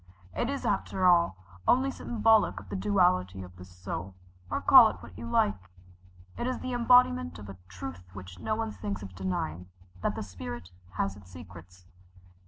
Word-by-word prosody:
It - - -1
is 280 0 -3
after 190 -1 0
all 170 - +4 0.3
only 265 +2 +3
symbolic 225 -4 +2
of - - -14
the - - -4
duality 175 - +1
of 90 0 -12
the 90 - -10
soul 90 0 -7 0.3
or - - -1
call - - +8
it - - -6
what 90 - -12
you 115 +3 -7
like. 100 -5 0 0.7
It 240 - -2
is 255 - -1
the 255 - -5
embodiment 235 - +4
of 100 -1 -10
a 95 - -9
truth 90 -1 -8
which 90 -2 -10
no 215 - -1
one 225 0 -3
thinks 205 - -5
of 95 -1 -9
denying 90 -1 -4 0.3
that - - -1
the - - -4
spirit 90 -2 -8 0.2
has 95 +1 -2
its 100 -3 -15
secrets. 90 0 -13
95 Hz, 180 wpm, -29 LUFS, -, 0.7 s, call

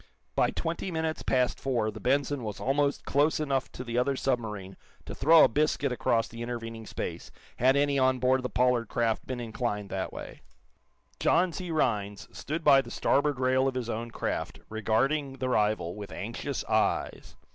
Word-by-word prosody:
By - - +3
twenty 170 +3 -3
minutes 160 -2 -2
past 125 -1 +1
four 120 -5 0
the - - -9
"Benson" 140 +1 +1
was 105 -2 -5
almost 140 +1 0
close 145 +3 +2
enough 135 -4 -1
to 125 - -6
the 120 -1 -1
other 135 +2 +1
submarine 110 -8 -2 0.3
to - - -6
throw 160 +4 +6
a - - +7
biscuit 145 +1 +1
across 115 -2 +1
the 115 0 -9
intervening 115 -2 -5
space, - - -5 0.3
had 130 +3 +4
any 140 -1 +2
on 130 0 +3
board 130 +1 +2
the 125 - -3
Pollard 125 0 +2
craft 115 -1 -1
been 130 -1 -4
inclined 110 -3 -3
that 95 -1 -3
way. - - -9 0.8
John 180 -1 +3
C. 180 0 -5
Rhinds 105 -9 -1
stood 155 +3 -4
by 140 -2 +7
the - - -11
starboard 145 -1 +1
rail 130 +1 +3
of 135 - -2
his 120 -2 -2
own 115 +2 -4
craft, - - -3
regarding 135 +7 0
the 130 -1 -3
rival 105 -7 +1
with 105 -1 -8
anxious - - -4
eyes. - - 0
130 Hz, 180 wpm, -28 LUFS, 115-140 Hz, 0.8 s, a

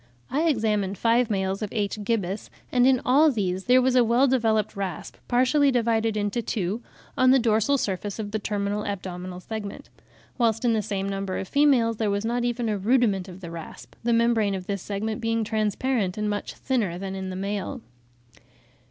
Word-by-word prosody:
I 310 +5 +1
examined 210 -7 0
five 235 +2 +2
males 195 -1 -1
of 210 - -2
H. 210 -1 -2
gibbus, 205 -2 -2 0.2
and 250 0 +4
in 260 -1 +4
all 290 +5 +5
these 190 -7 -2
there 255 +1 +5
was 260 0 +2
a 250 - +6
well 235 +4 +3
developed 225 -6 +1
rasp, 195 -3 -5
partially 260 +4 +3
divided 225 -3 +1
into 205 +3 -1
two, 210 0 -2 0.3
on 255 0 +4
the 265 - +7
dorsal 230 +3 +2
surface 200 -3 -3
of 210 -2 -5
the 215 - -1
terminal 205 0 -2
abdominal 180 -2 -5
segment; 205 +1 -7 0.5
whilst 225 0 +2
in 235 - +3
the 220 - +1
same 195 -1 -3
number 195 -1 -3
of 190 - -4
females 255 -5 +3
there 215 -2 0
was 200 +2 -1
not 240 +1 0
even 240 -1 -1
a 210 -2 -1
rudiment 205 -3 +2
of 185 0 -11
the 170 -2 -7
rasp, 165 -1 -9
the 235 - 0
membrane 230 -3 +2
of 185 -1 -6
this 200 -1 -3
segment 210 +2 -3
being 225 0 0
transparent, 215 -1 -1
and 210 0 -1
much 205 - -4
thinner 220 -10 -1
than 190 +1 -5
in 190 -1 -4
the 185 - -5
male. 200 +1 -3
215 Hz, 190 wpm, -25 LUFS, 195-240 Hz, 0.5 s, the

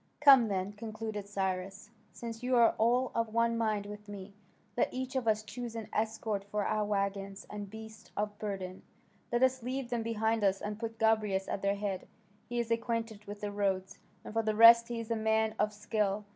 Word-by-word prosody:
"Come 270 -5 +8
then," 195 0 -2
concluded 215 -1 -5
Cyrus, 195 +1 -3 0.2
"since 230 -1 -7
you 250 0 +1
are 235 -1 +6
all 245 +3 +3
of 230 -1 -1
one 230 0 +3
mind 215 -3 0
with 210 0 -9
me, 200 -1 -8 0.4
let - - +1
each 260 +1 -4
of 255 -3 -1
us 215 0 +2
choose 230 +2 -6
an 220 -2 -6
escort 220 -2 -1
for 205 0 -2
our 215 0 +1
waggons 200 -1 -2
and 205 -1 -6
beasts 220 +1 -11
of 205 0 -2
burden. 190 -3 -4 0.5
Let 240 +1 +2
us 260 0 +3
leave 255 +1 -4
them 240 -1 0
behind 225 -1 0
us, 195 -1 +3
and 210 +1 -5
put 225 -1 -5
Gobryas 215 -4 +2
at - - -3
their 200 0 +1
head. 200 -2 -3 0.4
He 240 - -3
is 235 -1 -2
acquainted 230 -2 -2
with 205 0 -8
the 205 -1 -3
roads, 195 -2 -1 0.3
and - - -7
for 225 - +2
the 215 -1 -1
rest 230 +1 +9
he 240 -1 -4
is 230 0 -6
a - - +2
man 220 0 +1
of 210 0 +2
skill. 210 -1 -1
215 Hz, 200 wpm, -32 LUFS, 205-230 Hz, 0.5 s, rest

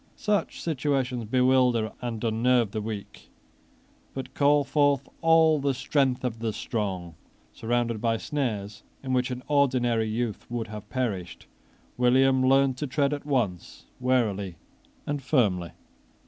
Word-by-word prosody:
Such 210 -1 -1
situations 135 -6 -1
bewilder 125 -2 +3
and 120 -2 -4
unnerve 115 0 +2
the 110 - -3
weak, 105 -1 -7 0.9
but 135 - -6
call 145 0 +3
forth 140 -1 +2
all 160 -2 +5
the 140 -1 0
strength 135 -1 0
of 115 -3 -3
the 115 -1 -2
strong. 95 -8 -3 0.4
Surrounded 115 -1 -1
by 115 -1 +1
snares 105 -8 -3 0.2
in 130 -1 -2
which 125 0 +1
an 125 0 -5
ordinary 125 -6 +2
youth 110 -1 -3
would 120 -2 -4
have 105 -1 -9
perished, 110 -9 -3 0.5
William 130 +1 +4
learned 135 0 +3
to 150 - -3
tread 140 +2 +1
at 145 0 -6
once 115 - -2
warily 110 -8 0 0.5
and 145 -1 -2
firmly. 105 - +1
125 Hz, 135 wpm, -26 LUFS, 110-135 Hz, 0.9 s, all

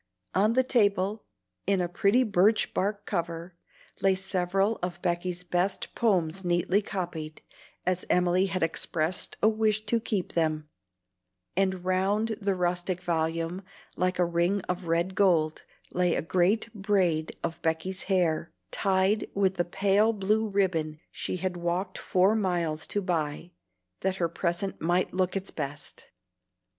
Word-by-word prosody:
On 210 +4 +3
the 260 +2 +4
table, 205 -4 +1 0.4
in 195 -1 +3
a 175 - +1
pretty 200 +8 +3
birch 210 0 +3
bark 200 +2 -1
cover, 170 -1 -3 0.5
lay 195 -1 +4
several 195 +2 0
of 175 -1 -3
Becky's 175 0 -1
best 180 +2 -1
poems 190 -5 +1
neatly 175 +3 +2
copied, 170 -6 -5 0.4
as 185 0 0
Emily 180 +1 +3
had 185 -2 -1
expressed 165 +1 +1
a - - +7
wish 215 -1 +1
to 230 +2 +1
keep 205 -5 -2
them; 155 -2 0 0.9
and 190 -1 0
round 195 +4 +1
the 195 -1 +1
rustic 180 0 -1
volume, 165 +1 -1 0.3
like 185 0 0
a 180 - +3
ring 175 +4 +1
of 180 -1 -4
red 170 +3 +1
gold, 170 -6 +2 0.3
lay 180 -1 +2
a - - -1
great 190 +7 +1
braid 190 -6 0
of 170 +1 -3
Becky's 165 +4 -2
hair, 170 -4 +1 0.2
tied 195 +2 +1
with 195 -1 +2
the 175 - +1
pale 200 +5 +2
blue 215 +2 +1
ribbon 165 -6 0
she - - -3
had 185 0 -2
walked 175 +2 -2
four 190 +4 +3
miles 175 -6 0
to 205 - -2
buy, 165 -2 -2 0.5
that 190 0 0
her 175 -3 0
present 175 +3 -2
might 175 +3 +1
look 185 0 0
its 195 0 -2
best. 145 +1 -6
185 Hz, 145 wpm, -28 LUFS, 170-195 Hz, 0.9 s, a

